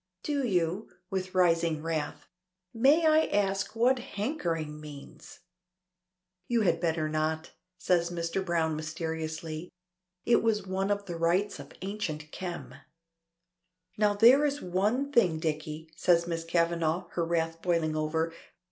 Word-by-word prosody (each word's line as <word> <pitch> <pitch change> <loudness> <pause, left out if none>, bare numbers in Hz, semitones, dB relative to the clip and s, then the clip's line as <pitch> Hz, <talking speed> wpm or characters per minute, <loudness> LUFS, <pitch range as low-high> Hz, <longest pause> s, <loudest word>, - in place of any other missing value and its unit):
"Do 285 -2 -1
you?" 185 -2 0 0.2
with 185 0 -3
rising 165 -3 +2
wrath. 160 -2 -3 0.5
"May 280 +8 +4
I 315 0 +5
ask 195 0 0
what 250 +3 +3
hankering 175 - -3
means?" 145 -2 -11 1.1
"You 235 -1 +2
had 170 -5 +2
better 165 -2 0
not," 155 +1 -1 0.3
says 175 -2 +1
Mr. 170 +2 -2
Browne 165 -3 0
mysteriously. 160 +1 -4 0.6
"It 235 - +4
was 220 -2 +1
one 190 +1 -1
of 200 0 0
the 175 -3 -5
rites 175 +5 +1
of - - -10
Ancient 165 -7 -4
Kem!" 175 -2 -6 1.2
"Now 210 -1 +2
there 245 +7 +7
is 290 -1 0
one 210 +10 0
thing, 185 - +3
Dicky," 155 0 -4
says 170 -1 +3
Miss 165 -1 -3
Kavanagh, 170 +1 0
her 170 - -1
wrath 165 0 -1
boiling 165 -3 +1
over. 160 +1 -1
170 Hz, 130 wpm, -29 LUFS, 160-205 Hz, 1.2 s, there